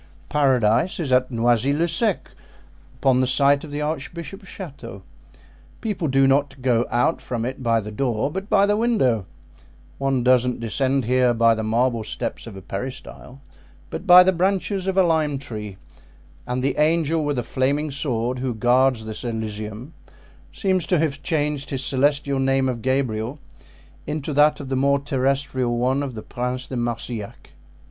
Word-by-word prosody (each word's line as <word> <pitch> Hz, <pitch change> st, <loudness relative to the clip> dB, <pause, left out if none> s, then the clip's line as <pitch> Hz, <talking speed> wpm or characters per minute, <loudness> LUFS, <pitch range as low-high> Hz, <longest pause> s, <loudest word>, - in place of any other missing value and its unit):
Paradise 130 Hz, -, +2 dB
is 150 Hz, -6 st, -2 dB
at 125 Hz, 0 st, +3 dB
Noisy 120 Hz, +2 st, +2 dB
le 160 Hz, +4 st, +1 dB
Sec, 195 Hz, +4 st, -1 dB, 0.7 s
upon 130 Hz, -1 st, +3 dB
the 130 Hz, -, +1 dB
site 140 Hz, +2 st, +3 dB
of 155 Hz, -, -8 dB
the 145 Hz, +1 st, -4 dB
archbishop's 170 Hz, +6 st, -5 dB
chateau. 140 Hz, -, -9 dB, 0.8 s
People 205 Hz, -7 st, -2 dB
do 135 Hz, 0 st, +3 dB
not 135 Hz, 0 st, +1 dB
go 120 Hz, -2 st, +2 dB
out 125 Hz, +7 st, +1 dB
from 120 Hz, -2 st, -3 dB
it 130 Hz, +2 st, -5 dB
by 115 Hz, -2 st, +2 dB
the 105 Hz, 0 st, -7 dB
door, 120 Hz, +3 st, -1 dB
but 190 Hz, +5 st, -5 dB
by 200 Hz, -1 st, +4 dB
the 205 Hz, 0 st, +2 dB
window; 205 Hz, -, +1 dB, 0.7 s
one 135 Hz, -2 st, 0 dB
doesn't 125 Hz, 0 st, +3 dB
descend 130 Hz, +3 st, 0 dB
here 125 Hz, 0 st, +2 dB
by 115 Hz, 0 st, +4 dB
the 110 Hz, -, -3 dB
marble 115 Hz, +1 st, 0 dB
steps -, -, -5 dB
of 110 Hz, -, -9 dB
a 95 Hz, -, -10 dB
peristyle, 130 Hz, +5 st, -7 dB, 0.5 s
but 195 Hz, -, -6 dB
by 180 Hz, 0 st, +10 dB
the 190 Hz, -, +3 dB
branches 190 Hz, +1 st, 0 dB
of 190 Hz, 0 st, -1 dB
a 190 Hz, -, +6 dB
lime 155 Hz, -4 st, +1 dB
tree; 105 Hz, -8 st, -7 dB, 0.7 s
and 125 Hz, +1 st, -2 dB
the 140 Hz, -, 0 dB
angel 160 Hz, 0 st, +2 dB
with 145 Hz, -2 st, -1 dB
a 125 Hz, -, -1 dB
flaming 140 Hz, +5 st, -1 dB
sword 125 Hz, -3 st, -2 dB
who 125 Hz, -2 st, -2 dB
guards 125 Hz, 0 st, +2 dB
this 110 Hz, -1 st, -6 dB
elysium 110 Hz, +3 st, -5 dB, 0.6 s
seems 190 Hz, -5 st, 0 dB
to 180 Hz, -, +2 dB
have 145 Hz, -3 st, -1 dB
changed 150 Hz, -2 st, -1 dB
his 135 Hz, -1 st, -2 dB
celestial 140 Hz, +1 st, +1 dB
name 135 Hz, 0 st, +2 dB
of 120 Hz, -3 st, -3 dB
Gabriel 130 Hz, -1 st, -1 dB, 0.7 s
into 150 Hz, 0 st, -3 dB
that 150 Hz, +1 st, +4 dB
of 135 Hz, -3 st, -7 dB
the 135 Hz, -, -1 dB
more 140 Hz, +2 st, +3 dB
terrestrial 135 Hz, -3 st, -1 dB
one 130 Hz, +3 st, +1 dB
of 135 Hz, -4 st, -4 dB
the 110 Hz, -, -7 dB
Prince 125 Hz, +1 st, -4 dB
de 130 Hz, -, -7 dB
Marsillac." 120 Hz, -3 st, -5 dB
135 Hz, 170 wpm, -22 LUFS, 120-150 Hz, 0.8 s, by